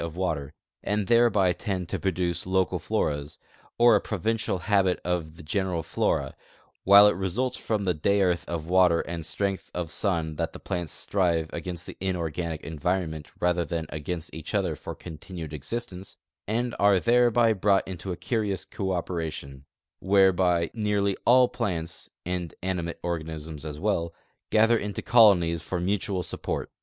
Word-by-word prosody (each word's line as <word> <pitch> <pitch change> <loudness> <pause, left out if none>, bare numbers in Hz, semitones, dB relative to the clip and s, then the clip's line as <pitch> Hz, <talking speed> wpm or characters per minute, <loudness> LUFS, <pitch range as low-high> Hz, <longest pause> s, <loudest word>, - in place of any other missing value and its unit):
of 85 -1 -5
water, 80 -6 -2 0.3
and 105 0 -1
thereb}^ 105 -5 +4
tend 95 -5 -2
to - - -3
produce 90 -2 -1
local 95 0 +1
floras, 75 +1 -2 0.4
or 120 0 +6
a - - +3
provincial 110 0 -1
habit 95 0 +2
of 85 -3 -2
the 80 - -12
general 90 +1 -1
flora; 70 -2 -1 0.5
while 100 +2 +9
it 105 - +3
results 95 +8 -1
from 105 -2 -2
the 90 - +2
dearth 90 +1 +2
of 85 -2 -3
water 90 -1 +3
anti 85 0 -4
strength 95 +4 -2
of 85 -3 -3
sun 80 -4 -1
that - - -2
the - - -9
plants 85 -3 -4
strive 85 -5 0
against 85 0 -5
the - - -9
inorganic 85 -3 -2
environment 80 -1 -2
rather 90 0 +2
than 80 0 -3
against 80 +2 -5
each 80 -1 -6
other - - +1
for - - -7
continued 80 -1 -8
existence, 95 - -5 0.3
and 120 +3 -1
are 100 -2 +5
thereby 120 0 +4
brought 100 -1 +2
into 95 0 -5
a 90 - -4
curious 105 -5 -2
cooi)eration, 80 -7 -4 0.3
whereby 95 -3 +3
nearly 105 -3 0
all 125 +1 +7
plants 95 -10 -4 0.2
(and 90 -2 -3
animate 90 -3 -2
organisms 80 -3 -4
as 75 -1 -6
well) 85 -4 -1 0.3
gather 110 +2 +4
into 100 0 -4
colonies 95 -8 +5
for 85 +2 -3
mutual 95 0 -1
support. - - -4
90 Hz, 150 wpm, -27 LUFS, 85-100 Hz, 0.5 s, while